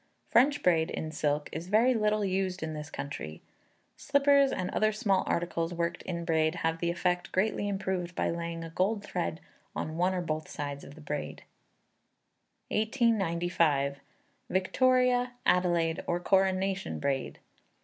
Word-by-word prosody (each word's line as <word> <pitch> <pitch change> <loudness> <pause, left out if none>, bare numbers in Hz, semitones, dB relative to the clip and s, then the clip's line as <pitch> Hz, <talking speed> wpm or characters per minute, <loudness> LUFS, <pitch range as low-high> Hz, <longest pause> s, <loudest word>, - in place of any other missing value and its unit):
French 280 +5 +4
braid, 165 -3 +3
in 155 - -4
silk, 145 -1 -1
is 165 +3 -5
very 225 +6 +4
little 215 -2 +1
used 190 -1 -1
in 160 0 -3
this 150 0 -6
country. 110 - -6 0.6
Slippers 280 -1 +4
and 185 -1 -2
other 215 0 +2
small 200 -3 +1
articles 170 0 -1
worked 170 +1 -2
in 170 -2 -4
braid 160 0 +2
have 165 0 0
the 170 - 0
effect 175 +1 -1
greatly 205 +1 0
improved 190 -3 -2
by - - 0
laying 170 0 -4
a 165 - -8
gold 200 +5 0
thread 175 -4 -3 0.4
on 155 +1 -4
one 180 +2 +2
or 180 - -1
both 155 -2 -3
sides 145 -1 -5
of 140 - -11
the 160 - -13
braid. 145 -1 -5 1.3
1895. 175 - +1 0.5
Victoria, 250 +5 +2
Adelaide, 175 -2 +2
or 175 - 0
Coronation 190 - +1
Braid. 135 - -2
175 Hz, 145 wpm, -30 LUFS, 160-205 Hz, 1.3 s, French